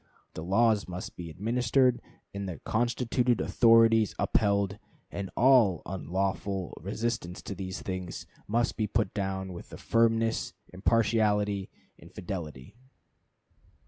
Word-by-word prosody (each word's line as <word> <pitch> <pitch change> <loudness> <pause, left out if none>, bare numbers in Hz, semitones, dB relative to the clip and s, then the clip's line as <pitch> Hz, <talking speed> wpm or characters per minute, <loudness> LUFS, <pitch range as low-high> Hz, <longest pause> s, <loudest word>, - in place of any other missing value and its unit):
The - - -6
laws 105 +3 +2
must 90 0 -7
be 85 -1 -7
administered, 120 - +1 0.3
and 100 -1 -4
the 85 - -6
constituted 120 +1 0
authorities 115 -2 +4
upheld, 100 -1 +1 0.3
and 100 -2 -5
all 120 - +5
unlawful 95 0 -2
resistance 105 -1 -3
to - - -5
these 95 -1 -6
things 95 -2 -5 0.2
must 120 +3 0
be 110 - 0
put 105 -2 0
down 95 -2 -3
with 85 - -10
firmness, 115 0 +1 0.2
impartiality, 105 -1 +1 0.3
and - - -15
fidelity." 80 -8 -7
100 Hz, 110 wpm, -29 LUFS, 95-115 Hz, 0.3 s, all